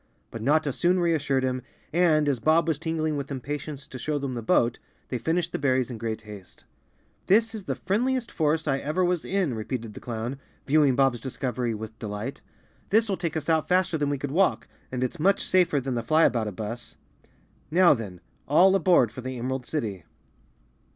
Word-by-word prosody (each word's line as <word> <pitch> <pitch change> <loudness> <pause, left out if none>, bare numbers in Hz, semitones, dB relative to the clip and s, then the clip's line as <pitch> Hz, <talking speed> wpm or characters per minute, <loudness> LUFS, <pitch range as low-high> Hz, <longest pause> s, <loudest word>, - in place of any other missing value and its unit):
But 115 - -6
Notta 145 +3 +2
soon 180 +5 +2
reassured 150 -6 +1
him 130 0 -1 0.3
and, 160 -3 +3
as 135 -4 +1
Bob 160 +7 +3
was 160 -3 0
tingling 160 -2 -1
with 140 -1 -4
impatience 140 +1 -5
to 130 - -9
show 150 +4 -1
them 140 -2 -3
the 120 - -4
boat, 115 +1 +2 0.3
they 125 - -2
finished 165 +6 0
the - - -3
berries 130 -3 +1
in 115 - -6
great 110 -1 -4
haste. 105 -4 -12 0.6
"This 225 +3 +4
is 210 -4 -6
the - - -2
friendliest 240 +6 -1
forest 155 0 0
I 135 -1 +1
ever 155 +7 0
was 175 -2 0
in," 190 -9 0
repeated 110 0 -4
the - - -9
clown, 120 +3 -4 0.3
viewing 145 -2 +4
Bob's 135 -4 +2
discovery 125 -2 -2
with 110 +1 -8
delight. 105 +4 -5 0.5
"This 220 +2 +3
will 195 - +1
take 170 -4 -3
us 150 - -4
out 160 -2 +2
faster 180 -2 +2
than 145 -2 0
we 145 - 0
could 135 0 -4
walk 190 +5 +2 0.2
and 130 0 -2
it's 140 +7 -3
much 195 +5 +2
safer 180 -6 +3
than 135 0 -3
the 120 - -1
Elyaboutabus. 115 - 0 0.7
Now 175 +2 +6
then, 100 -8 -6 0.3
all 180 +7 +6
aboard 175 - +4
for 130 - -8
the 130 0 -5
Emerald 125 +1 -3
City!" 105 - -3
140 Hz, 190 wpm, -26 LUFS, 120-165 Hz, 0.7 s, Now